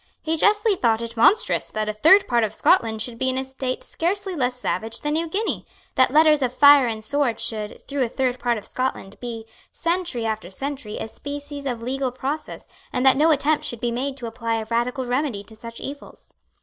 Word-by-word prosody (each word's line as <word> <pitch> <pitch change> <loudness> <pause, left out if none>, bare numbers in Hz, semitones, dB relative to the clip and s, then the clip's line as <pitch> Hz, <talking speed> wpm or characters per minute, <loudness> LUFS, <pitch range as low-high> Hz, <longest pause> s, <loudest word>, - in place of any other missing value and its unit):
He 320 0 -1
justly 420 +4 +3
thought 230 -7 +1
it 230 0 -6
monstrous 390 - +3
that 215 0 -3
a 215 - -1
third 325 - +5
part 240 -2 +2
of 215 0 -2
Scotland 220 -1 +2
should 230 -2 -6
be 260 - +1
in 260 - -1
a 265 - -2
state 265 -1 -4
scarcely 380 +2 -2
less 250 -4 0
savage 225 -2 -3
than 295 0 -1
New 330 +2 0
Guinea, 415 +7 -2 0.3
that 260 - +4
letters 305 +1 +5
of 255 -2 +1
fire 285 0 +7
and 220 -1 -4
sword 280 -2 0
should, 215 -2 -2
through 280 -1 -2
a 245 - +1
third 255 0 -1
part 240 -1 0
of 210 - -8
Scotland, 255 -6 -4
be, 230 -2 -6 0.3
century 335 -8 -1
after 215 -5 -3
century, 265 +1 -5
a - - -4
species 285 +3 -7
of 240 -3 -3
legal 260 +1 -2
process, 280 +5 -5 0.2
and 250 +1 -1
that 265 - +7
no 305 +4 +4
attempt 305 0 +2
should 235 - -3
be 240 0 -1
made 265 +3 -3
to 250 - -6
apply 230 0 -2
a 220 -1 -3
radical 245 +2 0
remedy 245 -4 -1
to 220 +2 -13
such 230 +1 -9
evils. 285 +1 -9
255 Hz, 215 wpm, -23 LUFS, 230-290 Hz, 0.3 s, fire